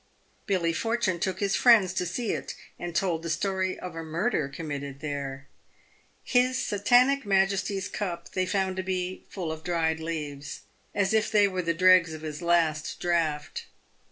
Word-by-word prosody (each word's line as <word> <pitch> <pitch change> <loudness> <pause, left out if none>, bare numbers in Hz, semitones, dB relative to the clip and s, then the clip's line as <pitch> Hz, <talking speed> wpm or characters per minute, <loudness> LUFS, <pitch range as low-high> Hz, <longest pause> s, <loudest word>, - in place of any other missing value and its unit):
Billy 175 -4 +1
Fortune 225 -3 0
took 190 +1 -2
his 200 -1 +1
friends 215 -7 +5
to 180 -1 -1
see 225 +5 -2
it, - - -4 0.2
and 175 -1 -5
told 175 -4 +1
the 165 - -5
story 185 +3 -1
of 180 -3 -7
a 165 - -4
murder 160 - -1
committed 140 -3 -6
there. 140 -2 -5 0.8
His 255 +1 +2
Satanic 245 +7 +3
Majesty's 195 0 +1
cup 170 -4 -5
they 185 -1 -1
found 190 -1 0
to 185 - -1
be 185 0 -3
full 175 -5 -4
of 160 0 -7
dried 165 -2 0
leaves, 150 -3 -5 0.3
as 200 +1 +1
if 220 -1 +2
they 205 -2 +5
were 185 -2 -2
the 170 -1 -1
dregs 180 -2 +5
of 155 - -10
his 155 +1 -5
last 165 -3 +1
draught. 165 -4 -1
180 Hz, 165 wpm, -27 LUFS, 160-195 Hz, 0.8 s, friends